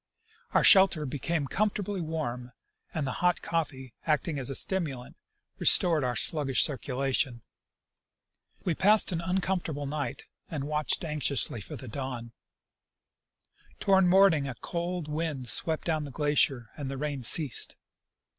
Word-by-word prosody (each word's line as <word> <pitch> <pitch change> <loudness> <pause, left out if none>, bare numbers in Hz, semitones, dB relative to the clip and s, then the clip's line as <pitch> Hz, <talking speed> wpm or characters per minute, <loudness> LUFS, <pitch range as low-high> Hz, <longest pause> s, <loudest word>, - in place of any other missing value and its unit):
Our - - +4
shelter 190 -6 +6
became 145 +3 -2
com 210 +10 +1
fortably 200 -2 -4
warm 125 -7 -4 0.4
and 155 -3 -3
the 135 - -2
hot 180 0 +1
coffee, 135 -7 -3
acting 150 -1 0
as 130 - -2
a 135 - -4
stimulant, 150 -10 -1 0.4
restored 165 -5 +4
our 125 -1 -1
sluggish 140 -3 +2
circulation. 135 -3 -2 1.2
We 175 - +1
passed 205 +5 +4
an 170 -1 -2
uncomfortable 180 -4 -2
night 145 0 -4 0.3
and 150 -5 -4
watched 150 +3 -1
anxiously 140 -6 0
for 100 - -8
the 130 - -9
dawn. 120 -1 -6 1.5
ToAvard 190 -2 +4
morning 175 -6 +4
a 130 - -5
cold 175 +3 -4
wind 150 -5 -2
swept 160 +5 +4
down 155 -3 -1
the - - -8
glacier 140 -5 0
and 145 -4 -5
the 135 - -5
rain 145 -1 -3
ceased. 135 +2 +2
150 Hz, 135 wpm, -28 LUFS, 135-170 Hz, 1.5 s, shelter